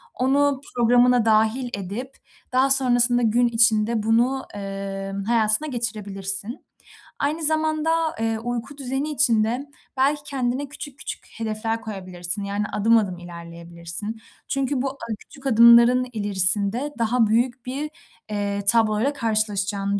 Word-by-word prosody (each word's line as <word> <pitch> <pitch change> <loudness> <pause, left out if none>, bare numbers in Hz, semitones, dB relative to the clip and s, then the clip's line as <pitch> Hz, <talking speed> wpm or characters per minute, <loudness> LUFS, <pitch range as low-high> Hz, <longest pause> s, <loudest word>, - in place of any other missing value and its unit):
Onu 275 +1 +2
programına 245 0 +4
dâhil 220 +3 +2
edip 205 +8 -6 0.4
daha 260 +2 +3
sonrasında 245 -2 +4
gün 235 +2 +3
içinde 225 -1 +2
bunu, 240 +4 +1
eee, 195 -1 -5
hayatına 225 +4 +2
geçirebilirsin. 210 -3 -4 0.5
Aynı 305 +3 -1
zamanda, 310 0 +1 0.3
eee, 225 0 -1
uyku 245 +4 -5
düzeni 270 +2 -3
için 240 -7 +3
de 245 +6 -2 0.3
belki 285 +3 +2
kendine 265 0 -2
küçük 285 -1 -9
küçük - - -7
hedefler 225 0 -2
koyabilirsin, 185 -3 -5
yani, 200 +1 -2
adım 225 +3 +4
adım 195 -5 -1
ilerleyebilirsin. 170 +4 -8 0.3
Çünkü 275 -1 -1
bu 275 - 0
a 275 - -16 0.2
küçük 275 - -16
adımların 235 +1 +6
ilerisinde 205 +6 0
daha 230 0 +2
büyük 240 +3 0
bir, 275 +4 -4 0.4
eee, 200 -1 -2
tabloyla 225 +4 +2
karşılaşacağını 205 -5 -1
230 Hz, 125 wpm, -23 LUFS, 205-260 Hz, 0.5 s, adımların